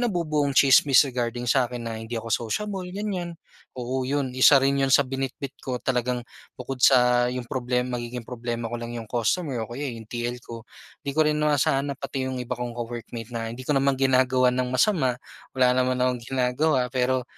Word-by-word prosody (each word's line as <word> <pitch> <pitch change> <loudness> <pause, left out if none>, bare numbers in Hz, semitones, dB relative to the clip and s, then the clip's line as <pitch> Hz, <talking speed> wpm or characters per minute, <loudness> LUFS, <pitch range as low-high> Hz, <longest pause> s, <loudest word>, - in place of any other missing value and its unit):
nabubuong 155 - 0
chismis 135 +1 +6
regarding 120 -2 -3
sa 125 0 +2
akin 120 -1 -6
na 115 - -4
hindi 115 +1 -5
ako 115 0 -4 0.2
sociable, 195 - -3
ganiyan. 180 -3 -4 0.4
Oo 130 +1 -3
'yon, 140 -2 -1
isa 130 +2 +6
rin 140 +1 +2
'yon 135 - +2
sa 140 +1 +5
binitbit 135 +1 -4
ko 130 -1 -3
talagang 125 -1 -1 0.3
bukod 130 +1 -6
sa 125 -1 +5
'yong 125 0 -4
problem 125 0 -2
magiging 120 0 -5
problema 120 -1 -4
ko 120 - -3
lang 120 0 -6
'yong 115 - -5
customer 125 +3 -1
o 110 - -5
kaya, 130 +5 -5
eh, - - -8
'yong 110 - -14
TL 120 +1 -4
ko, 115 -2 -10 0.4
'di 140 - -2
ko 155 - +1
rin 150 - +1
inasahan 145 -2 +1
na - - -7
pati 135 -2 -3
'yong 130 -1 -3
iba 125 - -4
kong 120 -1 -4
ka-workmate 115 -1 -6
na 115 -1 -4
hindi 125 +2 -9
ko 150 - +2
naman 135 0 +1
ginagawan 130 -1 +3
ng 125 0 0
masama, 130 - +2 0.3
wala 125 -1 +3
naman 130 0 +1
akong 125 -1 +1
ginagawa. 130 +2 +1
Pero, 130 0 0
125 Hz, 195 wpm, -25 LUFS, 120-135 Hz, 0.4 s, chismis